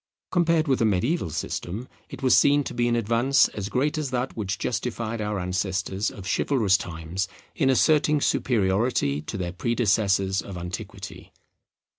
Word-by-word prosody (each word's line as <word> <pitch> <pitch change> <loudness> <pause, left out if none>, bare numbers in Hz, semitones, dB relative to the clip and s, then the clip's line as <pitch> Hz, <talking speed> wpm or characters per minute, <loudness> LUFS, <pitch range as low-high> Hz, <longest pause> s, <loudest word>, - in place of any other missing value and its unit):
Compared 170 -3 +2
with 135 -2 +2
the 115 - +3
mediaeval 110 - +1
system 100 - -4 0.2
it 135 0 -9
was 130 - +5
seen 145 0 +4
to - - -6
be 120 0 +1
an 120 - +2
advance 120 +4 +3
as 100 -1 -5
great 145 +6 0
as 150 -3 -2
that 125 +1 -2
which 100 -3 -3
justified 115 -2 -3
our 105 0 -2
ancestors 95 +2 -1
of 100 - -10
chivalrous 110 -3 +2
times 90 +1 -3 0.3
in 135 -4 +1
asserting 150 +2 +3
superiority 100 - +1
to 90 +7 -6
their 90 -2 -3
predecessors 100 -3 +1
of 95 -3 -8
antiquity. 90 +1 -7
110 Hz, 155 wpm, -25 LUFS, 95-130 Hz, 0.3 s, was